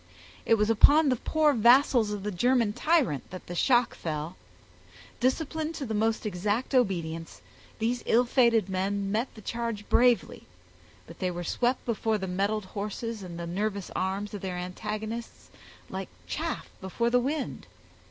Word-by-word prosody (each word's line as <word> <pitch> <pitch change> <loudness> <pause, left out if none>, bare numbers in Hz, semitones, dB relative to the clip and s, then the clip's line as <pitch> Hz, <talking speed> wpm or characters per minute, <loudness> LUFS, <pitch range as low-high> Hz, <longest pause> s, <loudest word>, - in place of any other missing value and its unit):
It 225 - +6
was 210 0 +2
upon 290 +7 +6
the 255 - +3
poor 305 +4 +2
vassals 240 -1 +5
of 205 -2 -4
the 210 - -2
German 235 +2 +2
tyrant 290 - +1
that 185 +1 -9
the 175 - -7
shock 240 +6 +3
fell. 155 +2 -4 0.8
Disciplined 315 +5 -1
to 275 - -4
the 220 - -3
most 220 +1 0
exact 210 +7 -1
obedience, 170 -9 -1 0.3
these 235 +2 -1
ill 245 +2 +4
fated 235 -5 +3
men 195 +1 -1
met 225 +5 -1
the 215 - -11
charge 230 -2 -4
bravely, 245 -1 +2 0.6
but - - -13
they 185 - 0
were 175 0 -4
swept 245 +8 0
before 225 -1 0
the 190 - -4
mettled 200 +3 -1
horses 210 +3 -5
and 175 -3 -8 0.2
nervous 200 -1 -2
arms 195 +2 -2
of 205 - -5
their 185 -2 -4
antagonists 215 +6 -6 0.4
like - - -6 0.2
chaff - - -3
before 235 +5 -1
the 245 - +5
wind. 280 +4 -3
215 Hz, 155 wpm, -28 LUFS, 190-245 Hz, 0.8 s, It